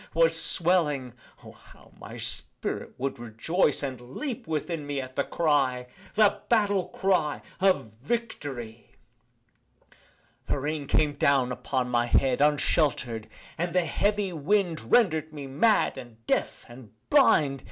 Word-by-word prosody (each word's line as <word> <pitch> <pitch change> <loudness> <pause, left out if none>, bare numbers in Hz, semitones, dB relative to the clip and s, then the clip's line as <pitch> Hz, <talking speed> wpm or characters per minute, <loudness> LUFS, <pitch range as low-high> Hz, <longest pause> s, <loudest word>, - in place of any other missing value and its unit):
was 165 0 +4
swelling 150 -8 +3 0.3
(O! - - -11
how - - -20
my - - -10
spirit - - -4
would 135 -1 -3
rejoice, 130 - 0
And 130 -3 -4
leap 220 - -6
within 155 -1 -3
me 145 -1 -2
at 130 -1 -7
the - - +1
cry) 135 -6 0 0.3
The 210 -2 +3
battle 205 -5 +2
cry 180 -6 0 0.2
of 185 - +2
Victory! 135 - -5 1.6
The - - 0
rain 145 +1 -3
came 150 0 +2
down 140 -3 +2
upon 130 0 -2
my 120 -1 +1
head 130 +1 +2
Unshelter'd 140 -6 +1 0.3
and 175 0 -2
the 180 -2 +3
heavy 200 +4 0
wind 165 - -1
Rendered 160 -9 +3
me 145 -2 -7
mad 155 +7 +2
and 115 -3 -14
deaf - - -1
and 120 -2 -13 0.2
blind. 150 - +4
145 Hz, 130 wpm, -27 LUFS, 130-180 Hz, 1.6 s, was